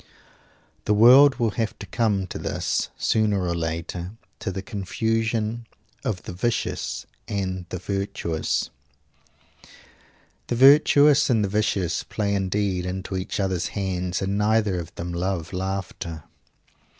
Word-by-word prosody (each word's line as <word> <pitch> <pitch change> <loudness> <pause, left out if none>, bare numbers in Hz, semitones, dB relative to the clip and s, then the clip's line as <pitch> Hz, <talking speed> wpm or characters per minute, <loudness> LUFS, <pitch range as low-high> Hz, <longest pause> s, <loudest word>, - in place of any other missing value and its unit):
The 105 - +2
world 130 +6 +8
will 115 -2 0
have 110 - -2
to - - -8
come 105 -5 0
to - - -7
this, - - -1
sooner 105 -3 +1
or 85 -1 0
later 85 +2 -4 0.3
to - - -3
the 95 +1 -5
confusion 110 +2 -2 0.4
of 95 -5 -2
the - - -7
vicious 115 +6 -2 0.2
and 95 -3 -3
the - - -4
virtuous! 90 -3 -2 1.8
The 120 - -1
virtuous 145 +2 +6
and 110 -4 +3
the - - -3
vicious 95 -4 0
play 100 -2 -2
indeed 95 -1 0
into 95 +1 -4
each 95 +2 -3
others 95 -3 0
hands; 90 -2 -2
and 100 +2 -1
neither 105 -3 +2
of 85 - -7
them 85 +1 -5
love 90 0 -2
laughter. 90 -4 -4
100 Hz, 130 wpm, -24 LUFS, 90-110 Hz, 1.8 s, world